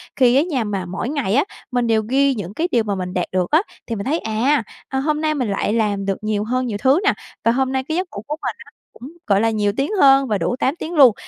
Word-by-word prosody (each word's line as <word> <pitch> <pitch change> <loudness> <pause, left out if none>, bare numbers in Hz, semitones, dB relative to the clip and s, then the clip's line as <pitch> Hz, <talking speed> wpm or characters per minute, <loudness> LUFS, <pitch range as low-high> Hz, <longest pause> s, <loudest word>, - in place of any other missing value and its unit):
Khi 250 -1 +4
á 275 - +5
nha 295 -9 -1
mà 200 -4 -3
mỗi 190 +8 -4
ngày 270 -8 -1
á, 280 - +4 0.3
mình 245 -1 +1
đều 220 -1 +3
ghi 275 +1 +3
những 200 -3 -6
cái 330 +9 -1
điều 235 -2 +3
mà 205 -2 -2
mình 180 -1 -4
đạt 180 - 0
được 185 -1 -1
á 315 +4 +5 0.3
thì 230 - -2
mình 200 - -5
thấy 305 +6 0
à, 230 +6 +1 0.2
a, 265 - -2
hôm 300 +2 0
nay 310 -1 +1
mình 250 -6 -1
lại 200 +2 -1
làm 205 -3 0
được 195 -1 -1
nhiều 215 -1 0
hơn 255 +3 -1
nhiều 220 -4 -3
thứ 265 - +3
nè. 410 - +3 0.3
Và 230 - +4
hôm 265 +2 0
nay 265 0 -1
cái 315 +4 -3
giấc 370 0 -1
ngủ 200 - -6
của 300 - -2
mình - - -3
á, - - -18 0.2
cũng, 265 +6 -11 0.2
gọi 200 -2 +3
là, 225 - +3
nhiều 210 -2 +1
tiếng 275 +6 0
hơn 270 -1 +6
và 210 -3 +1
đủ 175 +7 -1
8 270 - +1
tiếng 340 0 -6
luôn. 270 -8 +7
245 Hz, 285 wpm, -20 LUFS, 205-275 Hz, 0.3 s, luôn